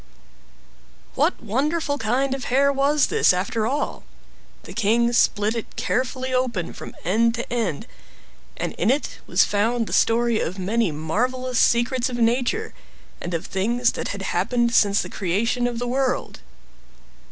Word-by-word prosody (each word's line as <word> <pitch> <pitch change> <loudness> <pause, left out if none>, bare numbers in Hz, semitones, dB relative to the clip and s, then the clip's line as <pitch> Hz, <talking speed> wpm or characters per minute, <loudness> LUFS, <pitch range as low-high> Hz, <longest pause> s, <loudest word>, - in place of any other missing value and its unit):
What - - 0
wonderful 285 +6 -1
kind 255 +4 0
of 270 -1 -5
hair 280 +3 +3
was 280 +1 +3
this - - +3
after 215 +5 -1
all? 285 +4 -2 0.6
The - - -10
king 235 +2 +2
split 215 -1 +2
it 230 - -6
carefully 255 +1 -2
open 240 -9 -1
from - - -10
end 230 +6 +2
to 235 0 -5
end, 220 -12 -2 0.7
and - - -3
in 195 - +2
it 275 +4 -1
was - - +4
found 225 +3 0
the - - -6
story 230 0 +3
of 180 +4 -3
many 205 +1 0
marvelous 245 +12 -1
secrets 240 +1 +2
of 245 - -4
nature, 245 - 0 0.5
and 175 0 -3
of 165 - -4
things 235 +6 +1
that - - -4
had - - -5
happened 240 -1 0
since 205 -2 +4
the - - -6
creation 220 +6 -1
of 240 -1 -4
the 245 +1 -3
world. 260 +1 -1
235 Hz, 150 wpm, -23 LUFS, 215-255 Hz, 0.7 s, was